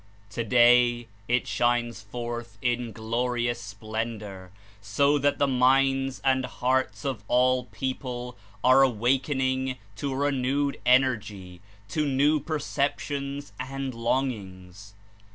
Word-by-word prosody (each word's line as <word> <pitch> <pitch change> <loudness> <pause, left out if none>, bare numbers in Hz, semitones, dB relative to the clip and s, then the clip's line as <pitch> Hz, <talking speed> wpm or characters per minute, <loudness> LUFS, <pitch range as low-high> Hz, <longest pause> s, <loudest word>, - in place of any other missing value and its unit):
Today 120 +1 +4 0.2
it 120 +1 +1
shines 120 -2 0
forth 120 +1 -6
in 120 0 -1
glorious 120 +2 -2
splendor, 105 -2 -6 0.3
so 140 +9 +2
that 145 +1 +1
the 145 - +3
minds 135 0 +2
and 130 -1 +2
hearts 130 +3 -1
of 130 -7 -3
all 125 0 +3
people 125 -2 -5 0.3
are 130 +2 +6
awak 125 +1 +2
ening 130 -2 -1 0.2
to 140 +4 -3
a - - -3
renewed 140 0 0
energy, 105 -8 +1 0.3
to 155 - 0
new 145 +3 +3
perceptions 140 -3 -3
and 135 0 -4
longings. 100 -6 -3
125 Hz, 110 wpm, -26 LUFS, 115-135 Hz, 0.3 s, are